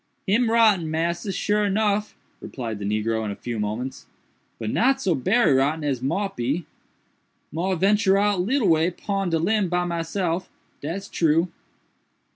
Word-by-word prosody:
"Him 225 Hz, +4 st, +2 dB
rotten, 215 Hz, -8 st, +4 dB
massa, 170 Hz, +5 st, -1 dB
sure 210 Hz, +1 st, +1 dB
nuff," 210 Hz, +1 st, 0 dB, 0.3 s
replied 115 Hz, -5 st, -5 dB
the 100 Hz, -, -5 dB
negro 110 Hz, +2 st, 0 dB
in 105 Hz, -, -3 dB
a 100 Hz, -, -4 dB
few 120 Hz, 0 st, -5 dB
moments, 110 Hz, +6 st, -4 dB, 0.5 s
"but 110 Hz, -1 st, -3 dB
not 270 Hz, +3 st, +2 dB
so 190 Hz, -9 st, +1 dB
berry 190 Hz, -, +3 dB
rotten 145 Hz, +4 st, +1 dB
as 135 Hz, -4 st, -1 dB
mought 190 Hz, +10 st, -1 dB
be. 140 Hz, +8 st, -1 dB, 0.9 s
Mought 175 Hz, +2 st, -1 dB
ventur 195 Hz, 0 st, +4 dB
out 205 Hz, -2 st, +2 dB
leetle 235 Hz, +3 st, +1 dB
way 165 Hz, 0 st, +4 dB
pon 195 Hz, +1 st, -3 dB
de 165 Hz, -, +1 dB
limb 195 Hz, +3 st, +1 dB
by 180 Hz, 0 st, 0 dB
myself, 170 Hz, +1 st, -2 dB, 0.3 s
dat's 180 Hz, +7 st, -4 dB
true." 165 Hz, +2 st, +2 dB
175 Hz, 155 wpm, -24 LUFS, 140-200 Hz, 0.9 s, rotten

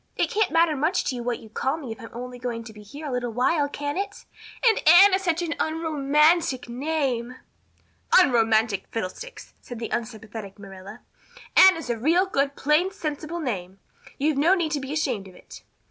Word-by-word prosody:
It -, -, 0 dB
can't 430 Hz, 0 st, +1 dB
matter 330 Hz, 0 st, +3 dB
much 310 Hz, +6 st, 0 dB
to 255 Hz, -, -2 dB
you 245 Hz, -, -5 dB
what 240 Hz, 0 st, -2 dB
you 225 Hz, -, -13 dB
call 265 Hz, +7 st, -2 dB
me 275 Hz, -8 st, -7 dB
if 225 Hz, -, -8 dB
I'm 225 Hz, -, -9 dB
only 250 Hz, +1 st, -8 dB
going 235 Hz, -2 st, -4 dB
to 225 Hz, -1 st, -11 dB
be 210 Hz, -, -13 dB
here 280 Hz, +10 st, -10 dB
a 285 Hz, -, -4 dB
little 250 Hz, -1 st, -2 dB
while, 285 Hz, +5 st, +1 dB
can 290 Hz, +1 st, -4 dB
it? 400 Hz, 0 st, -6 dB, 0.4 s
And 445 Hz, -, +4 dB
Anne 375 Hz, +4 st, +8 dB
is 380 Hz, -, +2 dB
such 345 Hz, -2 st, 0 dB
an 330 Hz, -1 st, -2 dB
unromantic 310 Hz, -2 st, +1 dB
name." 255 Hz, -2 st, -2 dB, 0.8 s
"Unromantic 225 Hz, -, +3 dB
fiddlesticks!" 230 Hz, -, -7 dB
said 245 Hz, -, -9 dB
the 230 Hz, -, -5 dB
unsympathetic 220 Hz, -3 st, -6 dB
Marilla. 195 Hz, -1 st, -11 dB, 0.5 s
"Anne 380 Hz, -2 st, +8 dB
is 285 Hz, -7 st, -4 dB
a 230 Hz, -, -3 dB
real 335 Hz, -, +3 dB
good 280 Hz, -6 st, -1 dB
plain 300 Hz, +6 st, +2 dB
sensible 315 Hz, -2 st, -5 dB
name. 195 Hz, -, -4 dB, 0.4 s
You've 290 Hz, 0 st, 0 dB
no 335 Hz, +6 st, +4 dB
need 335 Hz, -4 st, -1 dB
to 295 Hz, -, -1 dB
be 270 Hz, 0 st, -7 dB
ashamed 255 Hz, -11 st, -2 dB
of 185 Hz, -, -15 dB
it." -, -, -14 dB
275 Hz, 190 wpm, -24 LUFS, 230-320 Hz, 0.8 s, Anne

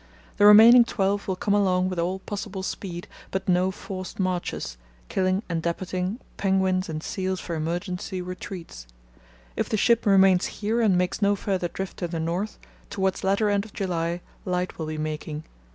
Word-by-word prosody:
The 205 Hz, -, +7 dB
remaining 225 Hz, +4 st, +9 dB
twelve 200 Hz, -3 st, -1 dB
will 190 Hz, -, 0 dB
come 200 Hz, +2 st, 0 dB
along 185 Hz, -3 st, +3 dB
with 185 Hz, -2 st, -3 dB
all 180 Hz, +3 st, 0 dB
possible 195 Hz, 0 st, -5 dB
speed, 180 Hz, -2 st, -5 dB, 0.2 s
but 190 Hz, 0 st, -3 dB
no 180 Hz, 0 st, +3 dB
forced 185 Hz, -1 st, -7 dB
marches, 175 Hz, -, -2 dB, 0.3 s
killing 185 Hz, +1 st, +1 dB
and 165 Hz, -2 st, -2 dB
depot 170 Hz, +2 st, -3 dB
ing 185 Hz, +6 st, -2 dB, 0.2 s
penguins 190 Hz, -2 st, +1 dB
and 155 Hz, 0 st, -4 dB
seals 190 Hz, -1 st, -2 dB
for 170 Hz, -, -5 dB
emergency 175 Hz, +3 st, -3 dB
retreats. 180 Hz, -, -7 dB, 0.7 s
If -, -, -1 dB
the 215 Hz, -, +1 dB
ship 230 Hz, +1 st, +3 dB
remains 190 Hz, -2 st, +5 dB
here 220 Hz, +3 st, 0 dB
and 200 Hz, -5 st, +4 dB
makes 180 Hz, +3 st, 0 dB
no 205 Hz, 0 st, +4 dB
further 190 Hz, -3 st, -1 dB
drift 190 Hz, +2 st, -6 dB
to 175 Hz, -, -2 dB
the 165 Hz, -1 st, -4 dB
north, 175 Hz, +6 st, -2 dB, 0.3 s
towards 190 Hz, -1 st, -1 dB
latter 200 Hz, +3 st, +2 dB
end 200 Hz, -1 st, +2 dB
of 220 Hz, -, -13 dB
July 175 Hz, -2 st, -2 dB, 0.2 s
light 180 Hz, -1 st, -2 dB
will 160 Hz, -, -3 dB
be 155 Hz, 0 st, -4 dB
making. 155 Hz, 0 st, -4 dB
185 Hz, 175 wpm, -25 LUFS, 175-200 Hz, 0.7 s, remaining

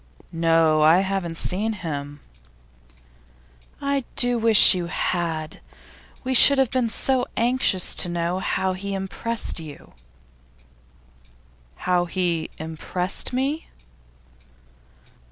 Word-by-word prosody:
'No; 165 Hz, -2 st, +2 dB
I 160 Hz, +4 st, +5 dB
haven't 190 Hz, -4 st, -4 dB
seen 210 Hz, +7 st, -3 dB
him.' 145 Hz, -6 st, -7 dB, 1.6 s
'I 280 Hz, -1 st, -1 dB
do 245 Hz, -1 st, +4 dB
wish 225 Hz, -2 st, +7 dB
you 180 Hz, -2 st, -4 dB
had! 165 Hz, -3 st, -3 dB, 0.6 s
We 260 Hz, 0 st, -2 dB
should 280 Hz, +2 st, +7 dB
have 265 Hz, -3 st, +1 dB
been 250 Hz, -3 st, 0 dB
so 255 Hz, +3 st, -1 dB
anxious 235 Hz, -6 st, +1 dB
to 180 Hz, -, 0 dB
know 170 Hz, +1 st, -3 dB
how 190 Hz, 0 st, -2 dB
he 195 Hz, +1 st, -5 dB
impressed 195 Hz, +3 st, -2 dB
you.' 155 Hz, -3 st, -12 dB, 1.8 s
'How 175 Hz, -, -1 dB
he 175 Hz, -2 st, -2 dB
impressed 160 Hz, +4 st, -3 dB
me? 270 Hz, +5 st, -3 dB
185 Hz, 100 wpm, -22 LUFS, 165-230 Hz, 1.8 s, wish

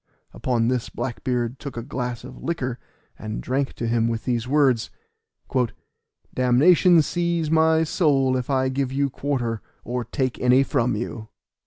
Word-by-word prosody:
Upon 120 Hz, -3 st, 0 dB
this 125 Hz, -1 st, -1 dB
Black 120 Hz, 0 st, -5 dB
beard 125 Hz, 0 st, -1 dB
took 140 Hz, -4 st, -7 dB
a 115 Hz, -, -3 dB
glass 125 Hz, -3 st, -4 dB
of 130 Hz, 0 st, -11 dB
liquor, 130 Hz, -7 st, -3 dB, 0.4 s
and 110 Hz, 0 st, -5 dB
drank 135 Hz, +2 st, -1 dB
to 120 Hz, -, -4 dB
him 115 Hz, 0 st, +1 dB
with 115 Hz, -1 st, -3 dB
these 120 Hz, -2 st, -1 dB
words: 135 Hz, -4 st, +2 dB, 1.4 s
"Damnation 155 Hz, +7 st, +5 dB
seize 170 Hz, -1 st, -1 dB
my 160 Hz, 0 st, +4 dB
soul 140 Hz, -5 st, +2 dB
if 125 Hz, 0 st, -3 dB
I 130 Hz, -1 st, +2 dB
give 130 Hz, 0 st, -1 dB
you 140 Hz, 0 st, 0 dB
quarter, 120 Hz, -7 st, -2 dB, 0.2 s
or 125 Hz, +1 st, -3 dB
take 130 Hz, +1 st, -2 dB
any 125 Hz, +2 st, +4 dB
from 125 Hz, -5 st, 0 dB
you." 110 Hz, 0 st, -5 dB
130 Hz, 155 wpm, -23 LUFS, 120-140 Hz, 1.4 s, Damnation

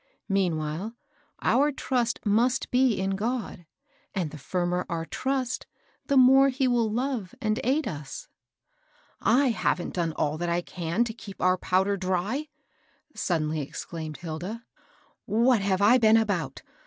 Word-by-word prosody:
Meanwhile, 180 Hz, +2 st, -1 dB, 0.5 s
our 290 Hz, +2 st, +3 dB
trust 250 Hz, -5 st, -1 dB
must 235 Hz, +5 st, +2 dB
be 250 Hz, -4 st, +3 dB
in 195 Hz, 0 st, 0 dB
GU)d; 215 Hz, -5 st, -3 dB, 0.5 s
and 175 Hz, -6 st, -1 dB
the 155 Hz, -, -9 dB
firmer 180 Hz, +4 st, -1 dB
our 165 Hz, -2 st, -2 dB
trust, 260 Hz, -, -2 dB, 0.4 s
the 280 Hz, -2 st, +3 dB
more 265 Hz, +2 st, +7 dB
he 265 Hz, 0 st, 0 dB
will 240 Hz, -3 st, +2 dB
love 240 Hz, -5 st, -2 dB
and 215 Hz, 0 st, 0 dB
aid 275 Hz, +4 st, +1 dB
us." 150 Hz, -7 st, -6 dB, 0.4 s
" -, -, -42 dB
/ -, -, -34 dB
haven't 230 Hz, -8 st, +2 dB
done 170 Hz, -3 st, -1 dB
all 155 Hz, +1 st, -1 dB
I 175 Hz, 0 st, 0 dB
can 175 Hz, +5 st, -1 dB
to 230 Hz, -2 st, -4 dB
keep 210 Hz, -3 st, -11 dB
our 185 Hz, 0 st, +3 dB
powder. 190 Hz, +2 st, +1 dB
dry! 190 Hz, -, -1 dB, 0.3 s
" -, -, -38 dB, 0.3 s
suddenly 155 Hz, -3 st, -1 dB
exclaimed 155 Hz, +2 st, -6 dB
Hilda. 180 Hz, +8 st, -6 dB, 0.4 s
" -, -, -37 dB, 0.2 s
What 245 Hz, -5 st, +4 dB
have 195 Hz, 0 st, +1 dB
I 240 Hz, +5 st, +6 dB
been 220 Hz, -1 st, +6 dB
about 205 Hz, -7 st, -1 dB
200 Hz, 150 wpm, -27 LUFS, 175-250 Hz, 0.5 s, more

